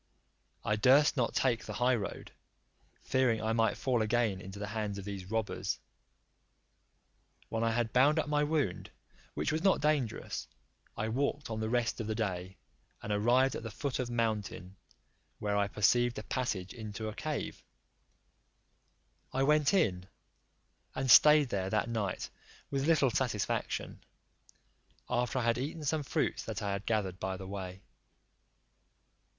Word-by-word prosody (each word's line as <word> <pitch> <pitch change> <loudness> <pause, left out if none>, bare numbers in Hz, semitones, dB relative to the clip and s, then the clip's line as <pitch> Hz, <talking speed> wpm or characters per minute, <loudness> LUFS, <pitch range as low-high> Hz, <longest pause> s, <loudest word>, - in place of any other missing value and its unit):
I 105 - +1
durst 135 +7 +5
not 125 -4 0
take 120 -4 +2
the 105 - -6
high 125 +1 +3
road, 110 -5 -4 0.7
fearing 130 -4 +2
I 110 +1 0
might 115 0 +2
fall 125 -4 +1
again 110 -3 +1
into 95 0 -9
the 105 0 -5
hands 105 -2 -2
of 100 - -7
these 95 -2 -6
robbers. 110 -1 -2 1.7
When 115 0 -1
I 115 - +2
had 115 0 -1
bound 140 +5 +5
up 160 - +1
my 150 0 +2
wound, 145 - -1 0.5
which - - 0
was 155 +1 -1
not 195 +1 +4
dangerous, 145 -6 -1 0.5
I 105 - -1
walked 140 +2 -1
on 110 - -3
the 110 0 -1
rest 120 -1 0
of 110 - -4
the 110 - -1
day, 95 -4 -3 0.5
and 105 - -2
arrived 125 +5 +3
at - - -4
the 115 - -5
foot 135 +5 -3
of 125 -1 -2
mountain, 110 -5 -2 0.6
where 105 -1 -1
I 100 0 +2
perceived 120 +4 +2
a 110 - -4
passage 105 -7 -2
into 110 -1 -6
a 110 - -4
cave; 150 +5 -4 1.7
I 135 - +1
went 150 0 +4
in, 95 - +1 0.9
and 135 -2 +1
staid 150 -1 +8
there 95 -3 -1
that 110 +3 0
night 105 -5 -2 0.4
with 140 +1 0
little 145 -6 +4
satisfaction, 110 -5 -2 1.0
after 125 +2 0
I 125 - +1
had 115 0 +2
eaten 150 +3 -4
some 155 +2 +1
fruits 140 - -1
that - - -4
I 100 - -1
had 100 +1 -4
gathered 100 -5 0
by 95 0 -3
the 95 - -8
way. 95 -1 -6
115 Hz, 155 wpm, -32 LUFS, 105-130 Hz, 1.7 s, staid